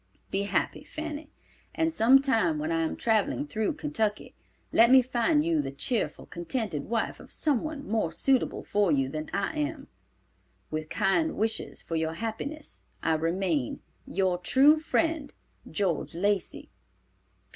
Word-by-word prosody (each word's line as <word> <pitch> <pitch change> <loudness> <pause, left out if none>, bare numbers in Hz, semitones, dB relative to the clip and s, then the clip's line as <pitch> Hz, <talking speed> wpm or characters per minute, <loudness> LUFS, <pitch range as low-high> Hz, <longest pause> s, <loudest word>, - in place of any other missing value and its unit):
Be 200 +1 0
happy, - - -1
Fanny, 310 -1 -6 0.5
and 325 0 +1
some 260 +4 +6
time 220 - +2
when 155 +2 -2
I 165 0 +1
am 160 - -1
traveling 225 +5 +1
through 220 0 -1
Kentucky, 285 -9 -2 0.4
let 235 +1 +6
me 260 0 +7
find 260 +5 +2
you 330 -2 +2
the - - -4
cheerful, 210 - -2
contented 175 - -3
wife 225 0 -2
of - - -13
some 290 -7 +2
one 310 -3 -5
more 215 -6 0
suitable 260 - +2
for 205 -4 +1
you 135 -2 +2
than 155 +2 -5
I 200 +10 -1
am. 295 -1 -3 0.8
With 155 0 -3
kind 315 +11 +1
wishes 220 +1 -2
for 165 - -4
your 160 0 0
happiness, 230 - -5 0.2
I 160 - +2
remain, 165 -4 -1 0.3
"Your 185 -2 0
true 285 - +5
friend, 320 -1 0 0.4
"GEORGE 180 -6 -1
LACEY." 200 +2 -1
225 Hz, 145 wpm, -28 LUFS, 175-290 Hz, 0.8 s, me